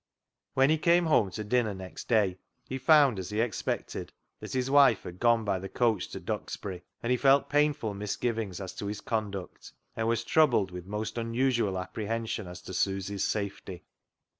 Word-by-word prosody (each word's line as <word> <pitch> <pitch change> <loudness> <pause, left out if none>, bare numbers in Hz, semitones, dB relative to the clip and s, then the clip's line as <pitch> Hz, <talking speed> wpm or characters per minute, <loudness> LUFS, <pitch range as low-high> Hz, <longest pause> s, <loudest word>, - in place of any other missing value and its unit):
When 135 +3 +4
he 160 - +2
came 170 +2 +4
home 130 -11 +3
to 100 +4 -5
dinner 110 -1 +1
next 95 -1 -9
day 100 -6 +2 0.3
he 130 - -4
found, 135 -5 +5
as 90 - -5
he 105 +1 -2
expected, 115 -1 -2 0.3
that - - -8
his 130 -1 0
wife 140 -6 +6
had 90 +1 -9
gone 115 -2 +3
by 100 -2 0
the 95 +1 -7
coach 115 0 +1
to - - -7
Duxbury, 95 -3 -5 0.2
and 120 - 0
he 125 - +3
felt 135 +2 +4
painful 145 -7 +2
misgivings 105 0 -3
as 95 -2 -6
to 100 - -4
his 105 0 -4
conduct, 100 -5 -4 0.2
and 115 0 -1
was 115 0 +1
troubled 120 -8 +3
with 90 0 -8
most 110 +3 -3
unusual 115 -3 0
apprehension 110 +2 -3
as 90 +1 -9
to - - -8
Susy's 95 +1 -1
safety. 100 -3 -4
110 Hz, 180 wpm, -29 LUFS, 95-125 Hz, 0.3 s, wife